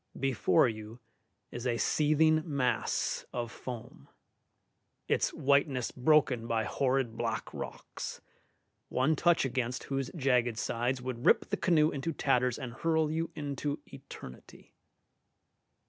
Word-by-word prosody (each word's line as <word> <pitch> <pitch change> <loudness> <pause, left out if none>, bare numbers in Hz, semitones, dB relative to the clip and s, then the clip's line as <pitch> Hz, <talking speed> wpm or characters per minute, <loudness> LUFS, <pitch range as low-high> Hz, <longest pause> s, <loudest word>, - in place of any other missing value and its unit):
Before 130 -7 +3
you 110 +1 -6 0.5
is 120 +1 -4
a 120 -1 +1
seething 155 +4 +3
mass 135 -7 0
of 120 -2 -3
foam, 120 -2 -8 1.0
its - - +1
whiteness 140 -2 +1
broken 130 -4 +3
by 115 -1 +1
horrid 130 0 0
black - - -3
rocks, - - -6 0.7
one 135 +5 +2
touch 170 0 +3
against 125 -1 -2
whose 135 -2 -2
jagged 125 -6 +2
sides 120 +2 -1
would 125 -1 -5
rip - - +4
the - - +3
canoe 155 -3 +3
into 145 +4 -3
tatters 125 -4 +1
and 125 -4 -6
hurl 160 +2 +1
you 165 +1 -1
into 145 -1 -3 0.2
eternity. 135 - -12
130 Hz, 120 wpm, -31 LUFS, 120-150 Hz, 1.0 s, rip